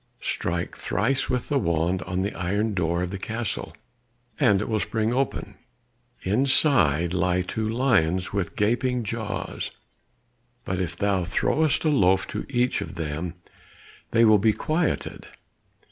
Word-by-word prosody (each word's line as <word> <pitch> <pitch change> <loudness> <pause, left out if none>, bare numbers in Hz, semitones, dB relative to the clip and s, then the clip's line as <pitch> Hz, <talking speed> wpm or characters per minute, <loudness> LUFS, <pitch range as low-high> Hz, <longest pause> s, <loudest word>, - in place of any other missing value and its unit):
Strike 85 0 -2
thrice 130 +6 0
with 125 -1 -1
the 145 - +2
wand 85 -1 0
on 90 +1 -1
the 100 - -2
iron 105 +4 -1
door 85 -1 0
of 90 - -4
the 100 - -5
castle 110 +2 -4 0.7
and 100 -2 +4
it 105 - -3
will 110 -1 0
spring 110 +2 -1
open: 135 +1 -1 0.7
inside 100 - +3
lie 90 0 +1
two 110 +4 -3
lions 95 -8 +1
with 95 -4 -2
gaping 120 +3 +1
jaws, 105 -3 -4 1.0
but 95 0 -1
if 90 - -4
thou 100 -3 +1
throwest 155 - +1
a - - +4
loaf 95 -9 +3
to - - -5
each 125 -2 +1
of - - -6
them, 80 +2 -4 0.7
they 115 0 +4
will 110 -1 +6
be 110 +2 +3
quieted. 160 +6 -2
100 Hz, 145 wpm, -25 LUFS, 90-120 Hz, 1.0 s, will